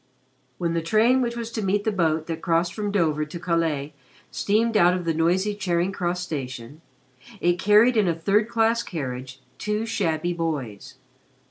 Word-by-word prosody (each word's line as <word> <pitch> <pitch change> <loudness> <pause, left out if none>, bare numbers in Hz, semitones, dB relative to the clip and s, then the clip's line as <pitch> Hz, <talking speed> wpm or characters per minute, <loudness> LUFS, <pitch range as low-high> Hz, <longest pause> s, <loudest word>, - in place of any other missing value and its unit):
When 170 -2 -1
the 165 - 0
train 220 +9 +3
which 235 -1 -2
was 230 -1 -5
to 225 - -3
meet 200 +1 0
the 220 - 0
boat 160 -5 0
that 165 -1 -5
crossed 170 0 +1
from 210 -2 -3
Dover 160 -6 +1
to 155 +3 -7
Calais 160 -4 -1 0.4
steamed 225 +3 +1
out 180 -3 +5
of 180 -2 -4
the 165 - +1
noisy 180 +6 +1
Charing 185 -2 -1
Cross 180 -1 -2
Station, 135 -4 -6 0.6
it 175 0 +1
carried 210 +5 +5
in 210 -4 +3
a 170 - +1
third 200 +7 +1
class 230 0 +2
carriage 130 - -6 0.2
two 210 +1 -1
shabby 175 -6 -1
boys. 145 -11 -4
175 Hz, 170 wpm, -24 LUFS, 160-210 Hz, 0.6 s, out